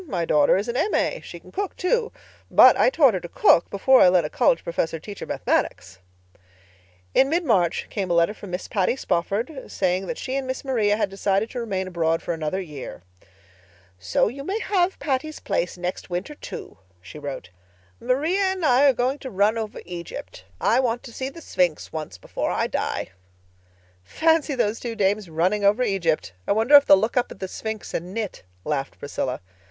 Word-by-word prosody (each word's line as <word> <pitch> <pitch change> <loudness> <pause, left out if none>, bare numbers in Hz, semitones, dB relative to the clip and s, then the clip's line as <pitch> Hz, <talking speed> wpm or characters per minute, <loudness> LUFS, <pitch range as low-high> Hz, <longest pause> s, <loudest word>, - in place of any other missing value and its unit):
My 175 - -1
daughter 150 +2 +4
is 200 +4 -2
an 235 - -3
M.A. 420 - 0
She - - -9
can - - -17
cook, 400 -1 -3
too. 455 +5 0 0.4
But - - +8
I - - +4
taught 290 - +4
her 185 - -1
to 175 - -9
cook 170 - +4
before 260 +7 +4
I 180 - +8
let 180 -3 +3
a 150 - -5
college 165 - +2
professor 165 -1 -2
teach 200 +4 -9
her - - -6
Mathematics." 95 - -1 1.1
In 270 - +4
mid 340 +3 0
March 185 - +2
came 195 -3 -3
a 170 - +2
letter 170 +4 +3
from 205 -2 -11
Miss 180 +1 -4
Patty 200 +1 +1
Spofford, 225 - -2
saying 185 0 0
that 245 - -4
she 260 - -4
and 270 -1 -2
Miss 260 +2 -4
Maria 215 -6 +1
had 200 -3 -1
decided 195 +2 0
to 250 - -4
remain 195 -5 -2
abroad 165 -2 0
for 175 - -2
another 160 +3 -2
year. 150 - -8 1.0
"So 90 -1 +1
you 270 +6 -6
may 385 +8 -2
have 380 -2 +1
Patty's 285 +2 -2
Place 175 +1 -2
next 180 +1 -5
winter, 180 +11 -4
too," - - -9 0.2
she 95 +12 -11
wrote. 135 -11 -7 0.5
"Maria 295 +11 0
and 380 -3 0
I 260 0 +5
are - - +4
going 255 +4 -1
to 265 - -7
run 205 +1 +2
over 220 -2 -5
Egypt. 170 - -8
I 235 - +3
want 240 -2 0
to 235 - -11
see 260 +2 -4
the 335 +5 -12
Sphinx 175 - -1
once 155 - -6
before - - -4
I - - 0
die." - - -2 0.9
"Fancy 320 - +1
those 225 -3 0
two 235 -2 -5
dames 205 -2 0
'running 180 +6 0
over 205 +5 +4
Egypt'! 170 - 0
I - - +3
wonder 225 +7 +1
if 285 0 +8
they'll 195 - +8
look 220 +6 -1
up 250 - +1
at - - -10
the 190 - -4
Sphinx 220 +2 -6
and 180 +3 -4
knit," 220 -4 -4 0.2
laughed 135 -3 -3
Priscilla. 130 -2 -4
205 Hz, 200 wpm, -24 LUFS, 175-260 Hz, 1.1 s, But